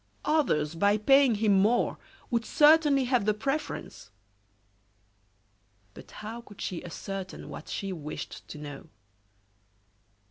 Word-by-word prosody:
Others, 170 - +1
by 200 +5 +2
paying 270 +2 +5
him 210 -1 +2
more, 220 +5 +2 0.3
would 235 -1 +1
certainly 295 +1 +5
have 250 -4 +1
the 215 -1 +2
preference! 275 +8 -4 1.8
But - - -13
how 225 +3 -8
could 205 -3 -16
she 180 - -4
ascertain 190 +2 -7
what - - -9
she 195 -1 -3
wished 150 -3 -7
to - - -9
know? 145 0 -9
215 Hz, 115 wpm, -28 LUFS, 190-270 Hz, 1.8 s, paying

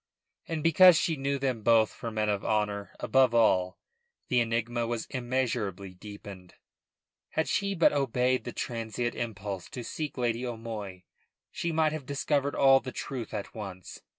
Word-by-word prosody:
And 160 -2 -3
because 170 +1 +7
she 160 - +1
knew 140 0 -1
them 130 -4 -1
both 110 -1 +4
for 115 - -6
men 110 -1 -1
of 100 -1 0
honour 105 -2 -1
above 130 -3 +3
all, 95 -5 +3 0.5
the 125 - +3
enigma 115 0 0
was 115 -1 -2
immeasurably 120 -7 -2
deepened. 100 -2 -11 0.7
Had 160 - -1
she 200 -1 0
but 165 - +4
obeyed 130 -2 +1
the - - -5
transient 115 0 -3
impulse 100 -5 -5
to 125 - -6
seek 150 +4 -5
Lady 120 -1 0
O'Moy 110 -6 -6 0.5
she 170 - -2
might 160 -1 +2
have 155 -4 -6
discovered 145 0 0
all 135 -1 +6
the 130 - -7
truth 125 -4 -5
at 105 -2 -5
once. 95 -4 -8
120 Hz, 155 wpm, -29 LUFS, 105-135 Hz, 0.7 s, because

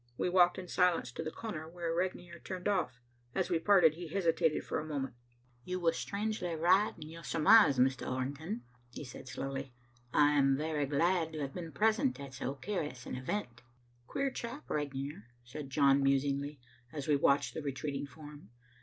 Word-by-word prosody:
We - - 0
walked 180 -1 +5
in 185 - -6
silence 175 -9 +2
to - - -5
the 160 - -3
corner 160 -5 -6
where 170 -1 -3
Regnier 175 -1 -3
turned 185 0 -5
off. 180 -12 0 0.4
As 190 -2 0
we 170 - +3
parted, 175 -4 +5
he 170 +2 -7
hesitated 165 -3 +1
for - - -2
a - - -4
moment. 140 -4 -3 0.5
"You 180 +4 -3
were 170 -2 +3
strangely 200 -2 -2
right 185 +6 +3
in 155 -2 -9
your 165 +1 -10
surmise, 165 -2 +6
Mr. 130 +1 +2
Orrington," 140 - -3 0.3
he 120 - -8
said 125 -1 -10
slowly. 135 0 -5 0.4
"I 145 0 +5
am 135 -2 +4
very 150 -1 -1
glad 165 +3 +1
to 155 - -4
have 135 -1 -3
been 165 -3 -6
present 220 - +2
at 140 -1 -8
so 135 +1 -3
curious 150 - -4
an - - -6
event." 130 - -4 0.5
"Queer 275 - -1
chap 250 +4 -6
Regnier," 140 -5 -3 0.2
said 135 +3 -8
John 140 0 +4
musingly, 140 +1 +1 0.3
as 145 -3 -5
we 150 - +4
watched 140 0 +3
the 160 - -4
retreating 140 0 -3
form. 145 -3 -12
155 Hz, 180 wpm, -33 LUFS, 140-180 Hz, 0.5 s, surmise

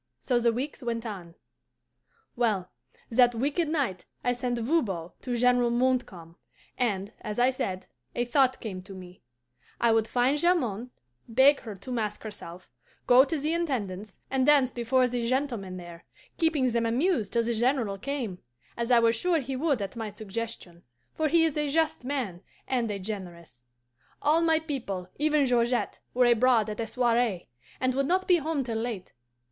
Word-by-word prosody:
So 245 -2 +1
the 235 0 +3
weeks 265 +6 -4
went 235 -1 -3
on. 180 -6 -7 1.0
"Well, 210 -7 0 0.4
that 245 0 +5
wicked 290 +7 0
night 270 - -1 0.2
I 245 - +2
sent 245 0 -2
Voban 225 - -1
to 250 -2 -3
General 245 0 +3
Montcalm, 235 -9 -1 0.4
and, 205 -5 -1
as 210 -1 -5
I 250 +2 +4
said, 190 -7 -4 0.3
a 240 - 0
thought 260 +1 +2
came 190 -5 -6
to 190 +1 -11
me: 180 -1 -12 0.6
I 235 - +4
would 225 0 +2
find 255 +5 +2
Jamond, 250 - +1 0.4
beg 265 +5 +5
her 215 -3 -8
to 200 +7 -9
mask 215 -4 -2
herself, 185 -5 -8 0.4
go 250 +1 +7
to 320 +3 -2
the 300 +3 -1
Intendance, 215 - -3
and 265 -1 +2
dance 280 -4 +5
before 250 +1 +2
the 240 -1 -2
gentlemen 240 -9 -2
there, 175 -1 -10 0.3
keeping 305 -6 +2
them 230 0 +1
amused 245 - +1
till 235 -1 +2
the 235 +1 0
General 230 -4 0
came, 240 -7 -4 0.4
as 235 0 -3
I 245 - +6
was 230 0 +4
sure 350 +8 +2
he 265 -1 -4
would 275 -5 0
at 195 - -6
my 225 -2 -4
suggestion, 210 -4 -6 0.3
for 315 - 0
he 325 +1 +4
is 315 - -1
a 295 -1 0
just 320 -2 +1
man 245 -10 -3 0.3
and 245 -4 0
a 205 - -2
generous. 180 - -8 0.6
All 310 +3 +3
my 325 -1 +4
people, 245 - -4
even 300 -1 +3
Georgette, 245 -1 +1 0.2
were 250 0 +5
abroad 240 -2 +4
at 210 - -7
a 225 - -2
soiree, 230 - 0 0.3
and 255 0 +1
would 275 +1 0
not 375 +3 +1
be 360 - +6
home 310 -3 -1
till 230 -3 -3
late. 225 -6 -5
240 Hz, 175 wpm, -28 LUFS, 210-270 Hz, 1.0 s, go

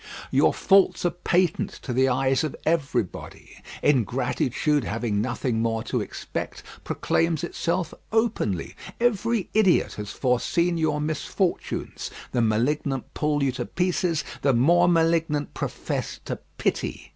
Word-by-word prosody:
Your - - +4
faults 195 -2 +3
are 175 - +3
patent 175 -1 +1
to 125 - -3
the 130 +2 +3
eyes 130 +2 +2
of 155 - -2
everybody; 140 - -2 0.2
ingratitude 130 +2 +1
having 110 -1 -1
nothing 120 -1 -1
more 115 -1 0
to - - -1
expect, - - -5 0.2
proclaims 165 -2 0
itself 170 0 -1 0.2
openly; 220 - 0 0.2
every 230 -2 +1
idiot 210 -5 +3
has 105 - -6
foreseen 170 +7 +1
your 155 -2 +1
misfortunes. 155 +4 -2 0.2
The 125 - +1
malignant 125 +4 0
pull 150 -1 0
you 135 - +2
to 130 - -4
pieces; 180 -2 0 0.2
the 135 -1 +3
more 170 +9 +5
malignant 165 -3 +2
profess - - -4
to - - -3 0.2
pity. - - -2
150 Hz, 125 wpm, -25 LUFS, 125-175 Hz, 0.2 s, more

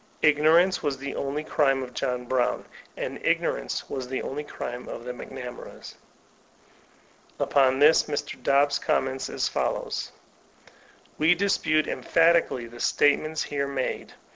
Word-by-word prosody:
Ignor 155 +2 +6
ance 185 +1 +1
was 145 -3 -1
the 140 +1 -5
only 140 +2 -3
crime 135 -4 +1
of 125 -1 -9
John 125 0 -2
Brown, 125 0 0 0.3
and - - -5
ignorance - - -1
was 130 -2 -5
the 130 +1 -3
only 145 +3 -4
crime 125 -3 -6
of - - -7
the 125 - -3
McNamaras.'* 125 0 -9 1.4
Upon 135 -2 +3
this 150 +3 +6
Mr. 145 -2 -4
Dobbs 140 0 +3
comments 130 0 -1
as - - -1
follows: - - -2 1.1
''We 165 +3 +4
dispute 155 -5 +2
en^hatically 165 -7 +2
the 120 +1 -12
statements 155 +4 +2
here 140 -1 -2
made. 135 -2 -4
140 Hz, 135 wpm, -26 LUFS, 130-155 Hz, 1.4 s, Ignor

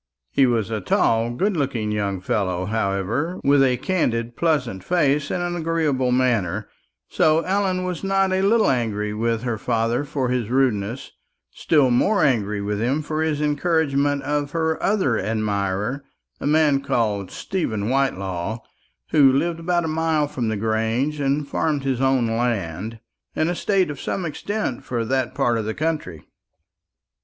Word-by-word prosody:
He 135 - +4
was 115 -3 0
a 110 -2 -2
tall 115 +5 +2
good 190 +12 0
looking 130 -8 -1
young 100 -3 -2
fellow, 95 -2 -1
however, 110 - -1
with 140 0 +4
a 125 -2 +2
candid 120 -8 -1
pleasant 125 - 0
face 150 - +1
and 175 - -1
an 175 0 -2
agreeable 155 -6 0
manner; 120 -9 +1 0.4
so 155 +1 +3
Ellen 185 0 0
was 180 -1 -4
not 195 0 +2
a 190 - +1
little 215 -3 +3
angry 105 -4 -1
with 115 +1 -1
her 120 -4 -2
father 115 +3 0
for 135 -3 -2
his 125 -3 -1
rudeness, 120 -3 0 0.4
still 145 -6 +2
more 200 - +3
angry 105 -7 +1
with 105 +1 -2
him 135 +6 0
for 155 +1 -2
his 155 -2 0
encouragement 145 -2 +1
of 145 0 -2
her 160 -1 0
other 185 - +1
admirer, 105 +3 -1 0.4
a - - -3
man 150 -2 +3
called 105 -7 -1
Stephen 110 - -3
Whitelaw, 100 -7 -1 0.5
who 140 -3 +6
lived 165 +5 0
about 175 0 0
a - - -1
mile 160 -1 +1
from 130 -5 -3
the 110 -1 -1
Grange, 115 +7 0
and 140 +1 0
farmed 150 -3 -1
his 135 -2 -1
own 130 -2 +3
land, 115 -3 -2 0.4
an 155 - +1
estate 185 -1 +1
of 140 - -8
some 185 - -2
extent 185 - -3
for 120 -2 -2
that 130 +1 -1
part 120 -4 +1
of 110 - -3
the 110 - -3
country. 155 - -3
135 Hz, 160 wpm, -22 LUFS, 110-155 Hz, 0.5 s, who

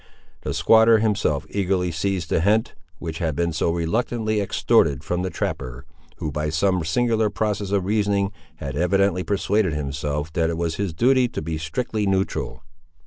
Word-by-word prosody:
The - - -3
squatter 115 0 +6
himself 105 -10 0
eagerly 95 -3 0
seized 90 +1 -2
the - - +2
hint 105 +5 +2 0.2
which 80 -1 -5
had 80 -4 -1
been 85 +1 0
so 80 - 0
reluctantly 110 +5 0
extorted 70 -7 +2
from 90 +2 -1
the 95 - -2
trapper, 60 -7 -4 0.3
who 75 - -4
by 75 +1 -2
some 90 +2 +1
singular 110 +6 +1
process 105 -1 -2
of 100 -2 0
reasoning 100 -1 +1 0.2
had 70 -3 -6
evidently 90 +3 +2
persuaded 100 -2 +1
himself 75 +1 -3
that 80 -2 +1
it 85 - -2
was 85 -1 -2
his 100 -5 -2
duty 125 +5 +4
to 120 - -5
be 80 0 -3
strictly 105 +6 -2
neutral. 95 0 -1
95 Hz, 165 wpm, -23 LUFS, 80-105 Hz, 0.3 s, squatter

